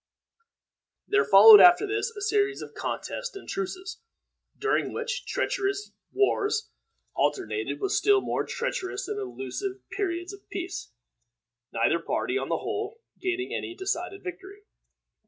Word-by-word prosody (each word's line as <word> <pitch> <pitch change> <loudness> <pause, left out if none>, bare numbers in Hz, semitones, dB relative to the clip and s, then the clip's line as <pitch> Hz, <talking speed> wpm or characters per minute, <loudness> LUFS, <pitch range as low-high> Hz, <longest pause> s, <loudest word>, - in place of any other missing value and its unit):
There 430 +2 +3
followed 440 -2 +10
after 355 +3 +7
this 425 +2 -1
a 410 - -7
series 405 -1 +1
of - - -11
contests - - -4
and 395 - -10
truces, 385 +2 -5 0.6
during 425 0 0
which 480 +1 -4
treacherous 395 +1 -1 0.2
wars 415 +2 +1 0.4
alternated 420 +2 -1
with 395 -1 -1
still 410 -1 +4
more - - -2
treacherous 470 -6 -3
and 425 -1 -3
illusive 395 0 -5
periods 360 -2 -3
of 400 - -15
peace, 365 - -5 0.8
neither 115 +9 +2
party, 370 - -2
on 405 - -2
the - - +1
whole, 425 +2 -5 0.2
gaining 370 0 -2
any 345 - -4
decided 380 0 -3
victory. 385 +3 -9
400 Hz, 130 wpm, -27 LUFS, 375-420 Hz, 0.8 s, followed